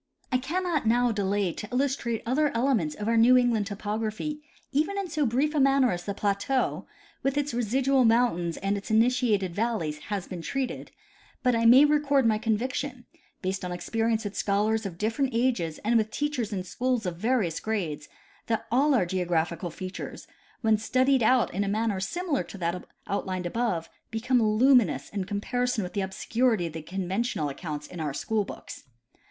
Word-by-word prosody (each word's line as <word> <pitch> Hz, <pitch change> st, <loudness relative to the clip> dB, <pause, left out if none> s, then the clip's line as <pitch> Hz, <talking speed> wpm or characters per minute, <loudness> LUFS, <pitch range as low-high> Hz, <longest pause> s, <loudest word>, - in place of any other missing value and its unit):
I 255 Hz, -, +2 dB
cannot 320 Hz, -1 st, -1 dB
now 240 Hz, +1 st, +3 dB
delay 200 Hz, -3 st, 0 dB
to 210 Hz, -, -7 dB
illustrate 250 Hz, -3 st, -1 dB
other 290 Hz, +5 st, +2 dB
elements 230 Hz, -, +1 dB
of 210 Hz, -, -5 dB
our 230 Hz, 0 st, +2 dB
New 245 Hz, +3 st, +7 dB
England 235 Hz, -5 st, +2 dB
topography, 215 Hz, +8 st, -3 dB, 0.3 s
even 315 Hz, +8 st, 0 dB
in 395 Hz, -2 st, -2 dB
so 300 Hz, -5 st, +1 dB
brief 270 Hz, +7 st, +1 dB
a 300 Hz, -, +1 dB
manner 270 Hz, -2 st, +4 dB
as 175 Hz, 0 st, -4 dB
the 200 Hz, -, -3 dB
plateau, 205 Hz, +7 st, 0 dB, 0.3 s
with 275 Hz, +1 st, 0 dB
its 290 Hz, -2 st, -1 dB
residual 255 Hz, +3 st, +2 dB
mountains 225 Hz, -8 st, +2 dB
and 200 Hz, +1 st, -1 dB
its 195 Hz, -, -11 dB
initiated 220 Hz, -5 st, +2 dB
valleys, 190 Hz, -8 st, -1 dB
has 205 Hz, -3 st, -3 dB
been 180 Hz, -3 st, -6 dB
treated; 265 Hz, +7 st, -3 dB, 0.5 s
but 250 Hz, -1 st, +3 dB
I 230 Hz, 0 st, +1 dB
may 255 Hz, +5 st, +8 dB
record 290 Hz, -3 st, +3 dB
my 215 Hz, -2 st, +3 dB
conviction, 245 Hz, +3 st, -2 dB, 0.4 s
based 190 Hz, +1 st, -2 dB
on 180 Hz, -, -3 dB
experience 225 Hz, +5 st, -1 dB
with 205 Hz, -1 st, -5 dB
scholars 215 Hz, +2 st, +1 dB
of 170 Hz, -3 st, -9 dB
different 230 Hz, +6 st, -1 dB
ages 230 Hz, -11 st, 0 dB
and 235 Hz, +2 st, +4 dB
with 220 Hz, -1 st, +1 dB
teachers 290 Hz, -5 st, -2 dB
in 190 Hz, -3 st, -2 dB
schools 245 Hz, +4 st, -1 dB
of 175 Hz, -2 st, -3 dB
various 210 Hz, -6 st, 0 dB
grades, 175 Hz, -10 st, -3 dB, 0.4 s
that 225 Hz, -1 st, -1 dB
all 275 Hz, +4 st, +4 dB
our 215 Hz, -, +3 dB
geographical 175 Hz, -1 st, -1 dB
features, 185 Hz, +3 st, -7 dB, 0.4 s
when 220 Hz, -2 st, +3 dB
studied 260 Hz, +4 st, +2 dB
out 250 Hz, +2 st, +3 dB
in 200 Hz, +3 st, 0 dB
a -, -, -2 dB
manner 210 Hz, -1 st, 0 dB
similar 305 Hz, -, -1 dB
to 200 Hz, -, -9 dB
that 175 Hz, 0 st, -2 dB, 0.2 s
outlined 185 Hz, -2 st, -3 dB
above, 175 Hz, -4 st, -1 dB, 0.2 s
become 240 Hz, +3 st, +1 dB
lumi 230 Hz, +2 st, +5 dB
nous 140 Hz, -3 st, -6 dB
in 200 Hz, -2 st, -3 dB
comparison 225 Hz, +3 st, -1 dB
with 180 Hz, -, -6 dB
the 200 Hz, -, -1 dB
obscurity 220 Hz, +2 st, 0 dB
of 165 Hz, -, -5 dB
the 160 Hz, -, -5 dB
conventional 185 Hz, -1 st, -2 dB
ac 135 Hz, -, -11 dB
counts 150 Hz, -4 st, -5 dB
in 175 Hz, +3 st, -9 dB
our 150 Hz, -3 st, -3 dB
school 220 Hz, +4 st, 0 dB
books. -, -, -9 dB
220 Hz, 180 wpm, -27 LUFS, 190-255 Hz, 0.5 s, may